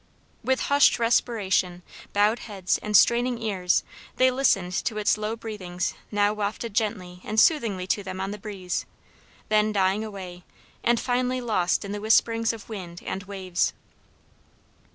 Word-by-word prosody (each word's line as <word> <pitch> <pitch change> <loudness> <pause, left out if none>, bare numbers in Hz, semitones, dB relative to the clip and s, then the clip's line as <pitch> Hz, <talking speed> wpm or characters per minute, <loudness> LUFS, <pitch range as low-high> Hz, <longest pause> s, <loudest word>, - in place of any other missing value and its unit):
With 260 0 +1
hushed 285 0 +4
respiration, 200 -6 +1 0.3
bowed 210 +3 +3
heads, 195 -4 -2
and 210 -1 +3
straining 240 +2 +3
ears, 190 -5 +1 0.3
they 255 0 +4
listened 200 -9 +2
to 215 - -1
its 210 - +2
low 215 +1 -3
breathings 200 -6 -4 0.2
now 205 0 +2
wafted 215 +1 -3
gently 185 -5 -2
and 215 - 0
soothingly 225 - +3
to 195 +2 0
them 185 -1 -6
on 195 +1 -2
the 210 - -6
breeze, 195 -4 -4 0.6
then 215 0 +3
dying 195 +1 +1
away, 185 -4 -8 0.4
and 240 -1 +3
finally 255 0 0
lost 210 -7 0
in 200 - -5
the 205 0 -4
whisperings 225 +1 +3
of 225 -2 -10
wind 180 -6 -8
and 195 +1 -4
waves. 185 -2 -1
210 Hz, 150 wpm, -25 LUFS, 190-230 Hz, 0.6 s, hushed